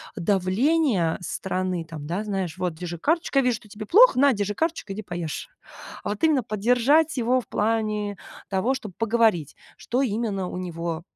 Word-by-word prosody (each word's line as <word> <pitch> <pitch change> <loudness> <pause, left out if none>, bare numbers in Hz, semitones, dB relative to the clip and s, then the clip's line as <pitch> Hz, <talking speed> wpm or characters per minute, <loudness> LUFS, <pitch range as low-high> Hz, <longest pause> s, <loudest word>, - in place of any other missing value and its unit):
давления 200 - +1
со 150 -4 -4
стороны. 185 -2 -2
Там, 160 -3 -8
да, 185 +6 -2
знаешь: 190 -4 -3
"Вот 180 -2 -1
держи 175 0 -6
карточка 320 - +1
я - - +2
вижу, 245 - +2
что - - -18
тебе 210 +1 -8
плохо. 450 - +6
На, 280 +1 +6
держи 205 0 -2
карточку, 320 - -2
иди 210 - -5
поешь". 175 -6 -5 0.5
А - - -4
вот 210 - -5
именно 300 -5 +4
поддержать 250 +9 +2
его 250 +1 +2
в - - -14
плане 210 -1 -1 0.3
того, 205 +7 +1
чтобы 210 -7 -7
поговорить, 225 - +2 0.2
что 250 +3 -1
именно 210 -5 -1
у - - -6
него, 170 -2 -4
210 Hz, 180 wpm, -25 LUFS, 180-245 Hz, 0.5 s, плохо